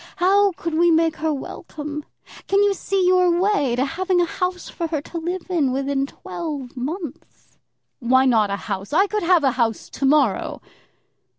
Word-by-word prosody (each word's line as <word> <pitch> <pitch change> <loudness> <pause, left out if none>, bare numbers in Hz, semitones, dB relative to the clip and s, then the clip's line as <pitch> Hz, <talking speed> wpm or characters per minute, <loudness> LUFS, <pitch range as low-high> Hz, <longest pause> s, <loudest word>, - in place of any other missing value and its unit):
How 395 +2 +4
could 335 -1 -5
we 340 +2 +4
make 325 -1 +2
her 315 0 0
welcome? 300 +1 -6 0.4
Can 395 +1 +3
you 405 -1 +3
see 390 -1 -1
your 360 -1 +4
way 365 -11 +1
to 255 +2 +1
having 360 +4 0
a 350 - +3
house 360 +1 -3
for 335 - -4
her 315 -2 -2
to 335 +3 -7
live 350 +2 -4
in 320 -8 +1
within 275 +1 -1
twelve 290 -5 -6
months?" 300 +4 -7 0.4
"Why 260 +1 +3
not 225 -5 +3
a 200 - -1
house? 200 +2 -4
I 385 +6 +5
could 425 +1 -2
have 350 -2 +3
a 270 - +4
house 230 -3 -1
to 275 - -3
morrow." 270 -9 +2
320 Hz, 180 wpm, -22 LUFS, 270-360 Hz, 0.4 s, I